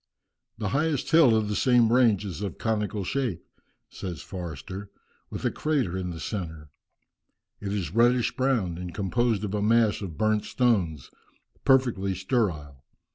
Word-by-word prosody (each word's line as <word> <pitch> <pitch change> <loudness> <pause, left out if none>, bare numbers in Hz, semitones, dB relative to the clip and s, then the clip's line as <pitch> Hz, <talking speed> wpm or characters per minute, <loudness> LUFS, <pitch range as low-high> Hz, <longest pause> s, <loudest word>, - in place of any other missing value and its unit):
"The 105 -3 -2
highest 150 +4 0
hill 155 -8 +6
of 110 -1 +1
the 105 - -2
same 120 -2 +4
range 115 -5 +4
is 90 -4 -6
of 100 -4 -4
conical 105 -2 -1
shape," 120 -4 -2 0.4
says 90 -5 -7
Forster, 90 +2 -7 0.4
"with - - -6
a - - +2
crater 140 - -1
in 95 -1 -3
the 85 -2 -6
centre. 80 -6 -5 0.9
It 100 -1 -4
is 95 -6 -3
reddish 120 +2 +3
brown, 115 -11 0
and 90 -1 -7
composed 110 +1 0
of 105 -1 -3
a 105 - 0
mass 110 0 +3
of 85 -6 -6
burnt 110 +1 +1
stones, 95 - 0 0.5
perfectly 120 -8 +3
sterile. 85 - -2
105 Hz, 150 wpm, -26 LUFS, 90-120 Hz, 0.9 s, hill